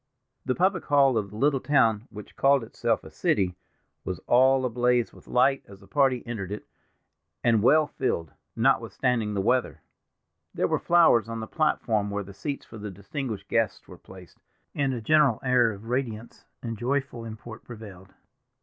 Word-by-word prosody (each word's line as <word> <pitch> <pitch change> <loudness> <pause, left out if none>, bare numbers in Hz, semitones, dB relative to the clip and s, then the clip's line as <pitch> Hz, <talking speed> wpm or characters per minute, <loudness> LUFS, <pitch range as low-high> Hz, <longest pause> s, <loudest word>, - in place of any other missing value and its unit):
The 130 - 0
public 185 0 +1
hall 140 -3 +4
of 105 -3 -1
the 105 - -12
little 140 +2 +2
town—which 115 -6 0
called 135 -2 +3
itself 115 - -1
a - - -12
city—was 90 -1 -3
all 130 +1 +4
ablaze 125 0 +1
with - - -17
light 135 +2 +2
as 100 -1 -14
the - - -18
party 135 -4 +2
entered 105 -6 -5
it, 105 - -6 0.8
and 115 -3 +3
well 155 +7 +5
filled, 85 - -3 0.2
notwithstanding 115 -2 +1
the 100 - 0
weather. 125 +5 0 0.7
There - - +1
were - - 0
flowers 165 -10 +4
on 115 0 -4
the 110 - -4
platform 110 -8 0
where 100 0 -3
the 100 +1 -12
seats 140 +9 -5
for 110 - -11
the 105 0 -6
distinguished 105 +4 -6
guests - - -1
were - - -13
placed, 95 -2 -15 0.3
and 140 -2 0
a 120 -3 -4
general 145 -1 +3
air 125 -3 +3
of 100 +1 -10
radiance 120 -2 -4 0.2
and 115 -3 -5
joyful 135 -1 -2
import 110 0 -9
prevailed. 100 -5 -12
120 Hz, 165 wpm, -26 LUFS, 105-135 Hz, 0.8 s, well